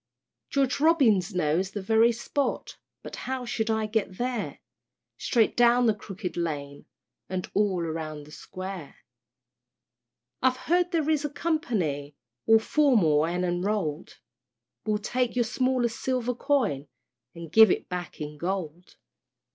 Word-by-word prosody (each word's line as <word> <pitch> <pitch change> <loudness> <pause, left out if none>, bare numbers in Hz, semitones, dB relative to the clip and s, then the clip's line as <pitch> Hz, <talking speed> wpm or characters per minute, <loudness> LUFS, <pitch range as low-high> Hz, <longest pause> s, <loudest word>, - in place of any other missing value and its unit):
George 275 -1 +1
Robins 230 - +3
knows 175 +2 +1
the 205 +1 -5
very 225 +3 +4
spot, 255 +4 -2 0.3
But - - -7
how 260 -1 -4
shall 225 -2 -1
I 220 - -1
get 215 -3 -2
there? 245 -2 -2 0.6
"Straight 230 -4 +2
down 240 +1 +5
the 220 - +4
Crooked 195 -2 -7
Lane, 145 -4 -4 0.4
And 185 -1 -3
all 195 -4 +1
round 155 -2 -5
the 150 - -15
Square." 185 -1 -8 1.5
I've 255 0 +3
heard 350 +4 +1
there 325 -4 0
is 305 -2 +1
a 295 - -1
Company 215 - -2 0.3
All 225 - +7
formal 220 - +3
and 180 +2 -1
enroll'd, 175 -3 -2 0.7
Will 210 -1 +2
take 245 +4 -1
your 240 -1 +2
smallest 250 -1 0
silver 250 -1 -1
coin 225 - 0 0.5
And 165 -2 -9
give 220 +2 +8
it - - 0
back 180 -3 -6
in 150 -1 -6
gold. 175 -1 -4
210 Hz, 135 wpm, -27 LUFS, 170-250 Hz, 1.5 s, give